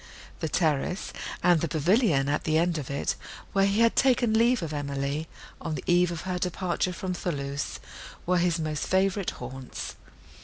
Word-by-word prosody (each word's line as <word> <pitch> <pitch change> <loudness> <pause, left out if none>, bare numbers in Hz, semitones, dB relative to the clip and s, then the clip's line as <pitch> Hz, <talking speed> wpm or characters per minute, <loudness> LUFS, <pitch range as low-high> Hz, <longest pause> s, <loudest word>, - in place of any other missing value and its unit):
The 160 - -2
terrace, 150 +5 0 0.3
and 175 -3 +5
the 170 - +1
pavilion 160 - +3
at 145 +1 0
the 155 0 +2
end 170 -1 +2
of 140 - -6
it, 140 0 -1 0.4
where 195 0 +4
he 200 +3 +2
had 230 0 +4
taken 245 -4 +3
leave 235 -1 +4
of 155 -2 -4
Emily, 140 +1 -2 0.3
on 160 -2 -2
the - - -5
eve 175 0 +4
of 170 -1 -4
her 180 -1 -2
departure 180 0 -1
from 185 +1 -3
Thoulouse, 140 -5 -3 0.5
were 180 0 +3
his 175 0 +2
most 155 -2 -2
favourite 195 0 +2
haunts. 130 +1 -7
170 Hz, 170 wpm, -27 LUFS, 150-185 Hz, 0.5 s, and